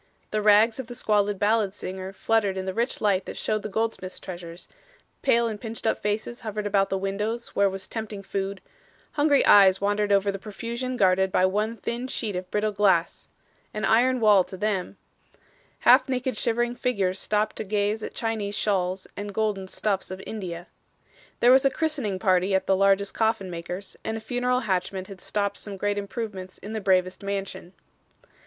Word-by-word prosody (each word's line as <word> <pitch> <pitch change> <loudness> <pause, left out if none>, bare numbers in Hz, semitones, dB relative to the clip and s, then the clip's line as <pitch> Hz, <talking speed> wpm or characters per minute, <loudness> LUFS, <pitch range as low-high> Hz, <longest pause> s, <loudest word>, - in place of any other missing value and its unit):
The 215 - 0
rags 215 +3 +5
of 260 - -5
the 245 - -8
squalid 205 -3 +1
ballad 205 -1 +1
singer 190 -1 -6
fluttered 205 -1 0
in 190 - -3
the 190 - -3
rich 235 +4 -1
light 195 -3 +2
that - - -7
showed 215 -1 -1
the 215 - -5
goldsmith's 220 -3 -3
treasures, 175 -2 -8 0.5
pale 235 0 +3
and 215 -2 -5
pinched 225 -1 -6
up 220 - +1
faces 215 +3 -2
hovered 215 -1 -4
about 200 -1 +2
the 195 - 0
windows 210 +5 -3
where 200 0 +2
was 190 0 -6
tempting 220 -3 -6
food, 195 0 -3 0.5
hungry 290 -1 +3
eyes 195 -2 +7
wandered 205 +1 0
over 200 0 +3
the 195 - -6
profusion 235 +5 -5
guarded 190 -1 +3
by 185 - +3
one 210 +4 0
thin 235 +4 -4
sheet 220 -6 -3
of 180 0 -5
brittle 210 +2 0
glass 195 -5 +1 0.5
an 215 - -1
iron 250 +3 +3
wall 210 -4 +6
to 190 - -9
them; 200 -2 -2 0.8
half - - +6
naked 255 -1 -1
shivering 240 +2 0
figures 195 -7 0
stopped 210 0 0
to - - -2
gaze 210 +1 0
at - - -6
Chinese 215 -3 -2
shawls 190 -2 0
and 205 -1 -6
golden 210 -3 -1
stuffs 195 0 -1
of 185 0 -6
India. 175 -5 -6 0.8
There 240 - +7
was 265 +1 +6
a 275 - +5
christening 275 -10 -1
party 185 0 +2
at 190 - +1
the 195 - +3
largest 195 +1 +3
coffin 220 -4 0
maker's 175 +3 -6
and 220 0 -2
a - - -4
funeral 250 +2 0
hatchment 190 -2 -2
had 190 -2 -10
stopped 200 -1 -2
some 200 -2 -5
great 205 +1 0
improvements 200 -3 -6
in 210 +2 -8
the 220 - -3
bravest 185 -1 +1
mansion. 195 -2 -5
205 Hz, 185 wpm, -26 LUFS, 190-225 Hz, 0.8 s, eyes